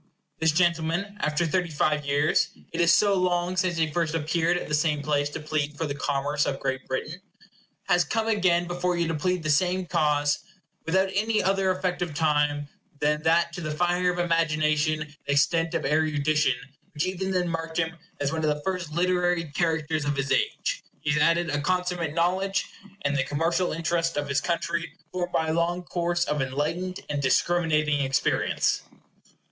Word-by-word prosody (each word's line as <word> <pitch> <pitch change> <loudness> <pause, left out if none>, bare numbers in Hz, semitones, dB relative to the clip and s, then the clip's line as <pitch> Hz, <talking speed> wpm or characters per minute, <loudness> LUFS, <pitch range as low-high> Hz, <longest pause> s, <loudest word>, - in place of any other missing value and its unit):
This 160 0 +3
gentleman, 170 +4 +1
after 150 +3 +1
thirty 175 +1 0
five 150 -1 0
years 145 +2 +2 0.2
it - - -1
is 170 0 +5
so 205 +3 +4
long 180 -1 +1
since 180 -2 0
he 160 -2 +1
first 165 0 -1
appeared 165 +2 +1
at - - -5
the - - -4
same 150 -1 +1
place 145 -1 +1
to 145 - -6
plead 150 -1 -2
for 160 - -1
the 145 - -2
commerce 145 +1 -1
of 135 - -2
Great 130 -1 -3
Britain 155 +7 -4 0.6
has 175 0 +3
come 220 +8 -1
again 185 -5 +2
before 175 0 -1
you 170 -1 +1
to 165 - -1
plead 180 +3 -1
the 155 - -2
same 180 +4 +2
cause, 145 -3 +1 0.5
without 190 +3 +2
any 215 +2 +1
other 195 0 +2
effect 185 -1 -1
of 170 -4 -3
time, 150 -1 +1 0.3
than 150 +1 +1
that 170 +2 +2
to 180 - -6
the 155 - -3
fire 175 +3 +1
of 180 - -5
imagination 155 -2 +1
and 150 -1 -8
extent 165 +4 +2
of 160 - -1
erudition 150 -1 +2 0.4
which 150 +4 0
even 190 +1 -2
then 180 -2 0
marked 165 -1 -4
him 175 0 0 0.2
as 140 -1 0
one 160 0 -2
of 155 - +2
the 150 - -10
first 180 -4 -3
literary 175 -2 +1
characters 160 -1 0
of 145 0 -1
his 135 0 -2
age, 425 +4 0 0.2
he 145 - 0
has 150 0 +2
added 165 +1 +3
a 145 0 0
consummate 180 -1 -1
knowledge 190 +3 +1 0.4
in 145 - +2
the 135 -2 +1
commercial 165 +6 0
interest 165 0 -1
of 145 0 -1
his 140 0 +1
country, 170 -2 -2 0.2
formed 180 -1 -3
by 160 -2 0
a - - +1
long 170 +2 0
course 175 0 -1
of 150 -1 -1
enlightened 160 +8 -2
and 145 -1 -2
discriminating 155 +1 +2
experience. 135 -1 +1
165 Hz, 185 wpm, -26 LUFS, 150-175 Hz, 0.6 s, is